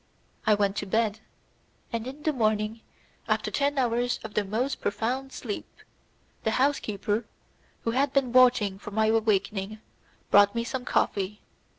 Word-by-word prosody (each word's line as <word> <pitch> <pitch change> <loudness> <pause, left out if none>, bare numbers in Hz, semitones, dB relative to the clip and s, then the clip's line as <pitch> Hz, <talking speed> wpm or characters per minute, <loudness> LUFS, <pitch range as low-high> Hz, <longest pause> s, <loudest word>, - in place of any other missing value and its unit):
I 215 - +6
went 200 -1 0
to - - -3
bed, 220 +1 +1 0.7
and 230 +1 -2
in 280 +3 -8
the 310 - +1
morning, 215 -2 0 0.5
after - - 0
ten 285 0 0
hours 245 -1 +1
of 220 -1 -7
the 210 - +1
most 225 +8 -2
profound 255 +6 -2
sleep, 215 -6 -5 0.8
the - - +1
housekeeper, 220 -5 0 0.6
who 230 - 0
had 270 +3 +1
been 265 -3 +1
watching 245 -6 +5
for 210 - -8
my 220 +1 +1
awakening, 215 -2 +1 0.5
brought 205 +2 +6
me 230 - 0
some 250 +1 -4
coffee. 200 +1 0
225 Hz, 150 wpm, -27 LUFS, 210-255 Hz, 0.8 s, I